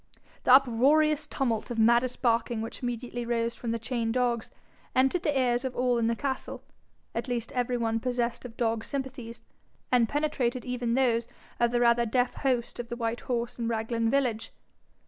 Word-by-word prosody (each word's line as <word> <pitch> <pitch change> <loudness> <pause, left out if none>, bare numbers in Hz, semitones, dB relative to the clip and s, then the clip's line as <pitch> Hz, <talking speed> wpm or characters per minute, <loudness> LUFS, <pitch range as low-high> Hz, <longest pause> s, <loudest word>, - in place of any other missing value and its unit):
The 250 - +6
uproariest 290 +4 +4
tumult 235 -6 -1
of 240 - -4
maddest 235 +3 +3
barking 235 -1 +2
which 225 - -7
immediately 245 0 -3
arose 235 0 -1
from 235 - -6
the 230 - 0
chained 230 0 -2
dogs, 240 -2 0 0.5
entered 265 +7 +3
the 290 -5 +1
ears 245 -1 +1
of 260 -1 -3
all 245 -1 +2
in 225 - +1
the 230 - +1
castle, 270 +1 -4 0.5
at - - -3
least 240 -2 -2
every 245 0 0
one 225 -1 0
possessed 245 -1 -2
of 235 -2 -10
dog 225 -2 0
sympathies, 265 -4 -6 0.5
and 240 -3 +4
penetrated 275 -4 -1
even 245 -2 -1
those 235 -3 +2 0.3
of 235 0 +3
the 240 0 +1
rather 235 0 +4
deaf 245 +2 +1
host 250 -4 -1
of 235 -1 -5
the 235 - -3
White 230 0 -2
Horse 240 -1 -3
in 230 - -1
Raglan 230 0 0
village. 245 -4 0
240 Hz, 180 wpm, -28 LUFS, 230-255 Hz, 0.5 s, The